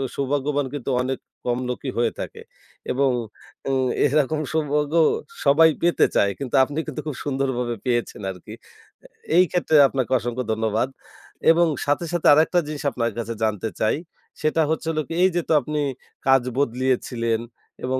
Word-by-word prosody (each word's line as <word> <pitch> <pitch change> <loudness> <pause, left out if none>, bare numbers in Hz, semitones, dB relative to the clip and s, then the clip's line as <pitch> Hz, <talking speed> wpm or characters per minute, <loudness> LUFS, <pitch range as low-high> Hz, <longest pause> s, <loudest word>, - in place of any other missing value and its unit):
সৌভাগ্যবান 140 +1 0
কিন্তু 140 -2 -4
অনেক 130 +1 -2 0.3
কম 120 0 0
লোকই 130 +2 -3
হয়ে 120 -1 +2
থাকে। - - -6 0.5
এবং 135 +2 +2 0.6
আ - - 0 0.4
এরকম 150 +1 +1
সৌভাগ্যও 150 +1 +2 0.4
সবাই 160 +3 +6
পেতে 175 0 +3
চায় 100 - +3
কিন্তু 135 -3 -3
আপনি 145 +3 -3
কিন্তু 145 - -5
খুব 150 - -3
সুন্দরভাবে 130 -4 -1
পেয়েছেন 120 -4 -1
আরকি 95 +3 -11 0.5
আ - - -12 0.3
এই 180 - +8
ক্ষেত্রে 175 -3 +1
আপনাকে 130 -2 -2
অসংখ্য 120 +2 -3
ধন্যবাদ। 110 +2 0 0.6
এবং 170 +1 +4 0.2
সাথে, 145 +4 0
সাথে 175 - +1
আরেকটা 160 +4 +4
জিনিস 150 -1 -5
আপনার 115 -2 -1
কাছে 115 0 -3
জানতে 110 -1 0
চাই, 110 - +2 0.5
সেটা 155 +1 +2
হচ্ছে 160 +1 -2
হলো 155 -1 -1
কি - - -5
এই 185 - +6
যে, 175 - +2
তো - - +4
আপনি 150 +3 -3 0.5
কাজ 135 -1 +6 0.2
বদলিয়েছিলেন 125 -3 0 0.5
এবং 130 +1 0
135 Hz, 155 wpm, -23 LUFS, 120-150 Hz, 0.6 s, এই